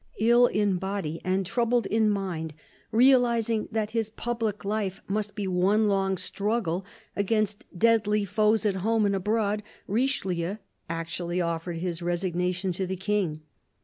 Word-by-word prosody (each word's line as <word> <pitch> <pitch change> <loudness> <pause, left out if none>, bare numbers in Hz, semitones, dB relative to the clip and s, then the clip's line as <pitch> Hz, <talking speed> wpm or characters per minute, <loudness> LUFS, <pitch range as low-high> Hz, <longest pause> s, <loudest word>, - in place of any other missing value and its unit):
Ill 240 +3 +5
in 205 -4 +1
body 190 -4 -3
and 190 +1 0
troubled 235 +3 +1
in 220 +1 +2
mind, 175 -6 -2 0.4
realising 235 -3 +3
that 220 -1 -1
his 225 -2 -1
public 225 -2 -3
life 200 -2 -1
must 210 +1 -2
be 205 -2 -3
one 190 +4 +3
long 195 -1 +1
struggle 200 -3 -1 0.3
against 210 0 0
deadly 210 -1 +3
foes 215 +2 +2
at 200 -2 +1
home 220 +3 +2
and 200 - +2
abroad, 210 +1 0 0.2
Richelieu 200 -6 -1 0.3
actually 170 +1 -3
offered 170 0 -2
his 175 0 -3
resignation 180 +1 -1
to 185 +2 -2
the 190 - -2
King. 190 -6 -1
200 Hz, 140 wpm, -27 LUFS, 180-220 Hz, 0.4 s, Ill